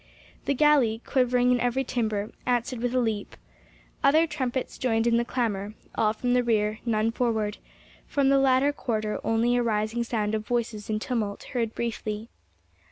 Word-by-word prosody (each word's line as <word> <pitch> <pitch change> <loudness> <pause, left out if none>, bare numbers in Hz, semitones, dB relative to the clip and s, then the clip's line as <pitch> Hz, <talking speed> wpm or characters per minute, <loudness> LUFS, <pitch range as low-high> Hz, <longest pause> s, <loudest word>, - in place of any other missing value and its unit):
The 280 - +1
galley, 265 -6 +4
quivering 250 -1 +2
in 250 - +3
every 245 +2 +1
timber, 220 -4 -2 0.2
answered 245 0 0
with 245 +1 -1
a - - +4
leap. 220 -4 -2 0.7
Other 310 +4 +5
trumpets 265 -5 -3
joined 225 -3 +1
in 235 0 +3
the 235 - +2
clamor—all 215 -2 -2
from 245 +2 -1
the 250 0 +3
rear, 215 -2 +1
none 220 0 +2
forward—from 230 +4 -2
the 275 0 +5
latter 270 +1 +3
quarter 215 -6 -2
only 230 +2 +2
a 245 - +2
rising 220 +1 0
sound 220 -3 -1
of 215 -1 -1
voices 225 -2 -2
in 215 - 0
tumult 215 -3 -3
heard 230 -3 -1
briefly. 220 -1 -3
235 Hz, 160 wpm, -26 LUFS, 215-250 Hz, 0.7 s, Other